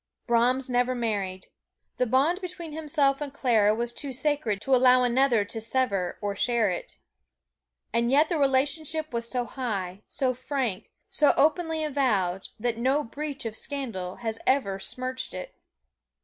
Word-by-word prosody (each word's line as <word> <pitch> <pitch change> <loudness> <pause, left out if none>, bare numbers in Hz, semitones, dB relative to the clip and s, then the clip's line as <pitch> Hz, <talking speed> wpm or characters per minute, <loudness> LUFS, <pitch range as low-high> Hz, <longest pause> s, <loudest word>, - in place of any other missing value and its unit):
Brahms 245 +3 +2
never 250 0 +1
married 200 -6 -2 0.5
the 250 - +1
bond 290 - +2
between 345 -3 -6
himself 295 -3 +1
and 290 -2 -4
Clara 225 -7 +3
was 235 +1 -2
too 280 +1 -4
sacred 260 -6 0
to 270 +3 +3
allow 250 0 +6
another 245 -3 +3
to 225 +1 -5
sever 220 -6 0
or 205 -1 -2
share 230 -2 +2
it. 180 - -6 1.0
And 235 +1 +2
yet 290 +4 +5
the 330 -2 -1
relationship 290 +3 +1
was 235 0 -2
so 245 -2 -1
high, 200 -8 -4
so 255 -2 0
frank, 255 -5 -3 0.2
so 295 - +4
openly 320 +1 +2
avowed, 210 -11 0
that 235 0 -1
no 270 +5 +2
breath 285 +3 -6
of 220 -1 -3
scandal 220 -11 -4
has 225 0 -2
ever 200 -8 +2
smirched 255 +4 -4
it. - - -7
255 Hz, 150 wpm, -27 LUFS, 225-280 Hz, 1.0 s, allow